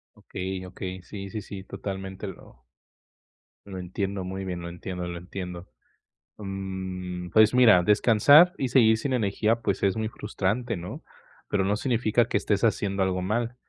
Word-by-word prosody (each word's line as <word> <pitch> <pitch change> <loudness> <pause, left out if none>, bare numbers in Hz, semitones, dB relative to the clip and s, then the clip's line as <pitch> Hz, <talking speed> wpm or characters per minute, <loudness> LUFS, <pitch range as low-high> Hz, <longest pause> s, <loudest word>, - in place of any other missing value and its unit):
Okey, 95 0 -5
okey. 90 0 -6
Sí, 100 0 -8
sí, 105 +2 -5
sí, 100 -1 -8
totalmente 95 0 -6
lo 95 - -12 1.0
lo 100 -2 -8
entiendo 95 +2 -3
muy 95 +1 -5
bien, 90 -2 -4
lo 85 - -6
entiendo, 90 +1 -6
lo 85 0 -5
entiendo. 90 0 -7 0.7
Mm, 95 -2 -5
pues 110 +1 +5
mira, 115 -8 +7
descansar 120 - +6
y 135 - -1
seguir 110 -3 +5
sin 130 +4 -2
energía, 110 0 +1
pues, 100 -4 -1
es 100 -1 +3
muy 110 -1 -1
frustrante, 110 +2 -2
¿no?, 85 +1 -8 0.5
pero 100 -2 +2
no 100 +2 +1
significa 120 -1 +1
que - - 0
estés 100 -2 0
haciendo 100 -3 +1
algo 95 -1 0
mal. 115 +5 -1
100 Hz, 160 wpm, -26 LUFS, 95-110 Hz, 1.0 s, mira